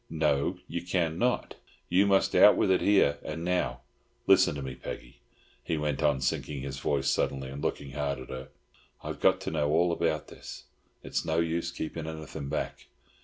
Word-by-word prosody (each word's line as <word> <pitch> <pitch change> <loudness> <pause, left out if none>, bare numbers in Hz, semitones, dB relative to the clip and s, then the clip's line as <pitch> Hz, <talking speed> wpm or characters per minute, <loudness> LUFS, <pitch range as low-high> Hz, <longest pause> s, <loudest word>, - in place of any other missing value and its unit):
"No, 75 +2 +1
you 85 0 -3
can 85 -2 -1
not. 125 0 0 0.3
You 95 +3 +4
must 95 -1 +3
out - - +8
with - - +3
it 95 - +3
here 100 -8 +4
and 80 +2 -5
now. 90 -9 0 0.4
Listen - - +5
to 70 - -5
me, 65 - -5
Peggy," - - -8 0.4
he 80 - -1
went 75 -2 -1
on, 75 -4 +2
sinking 70 +1 -2
his 70 0 -5
voice 70 -2 0
suddenly 65 -1 0
and 70 +1 -7
looking 70 -1 -3
hard 70 -1 -2
at 65 -1 -10
her. 65 0 -6 0.6
"I've - - -5
got - - +4
to - - -3
know 75 - 0
all 85 +3 +3
about 80 -2 0
this. - - -10 0.4
It's - - -2
no 80 0 -1
use 85 +1 0
keeping 80 -1 -5
anything 80 -3 -6
back. 75 - -4
75 Hz, 185 wpm, -29 LUFS, 70-85 Hz, 0.6 s, out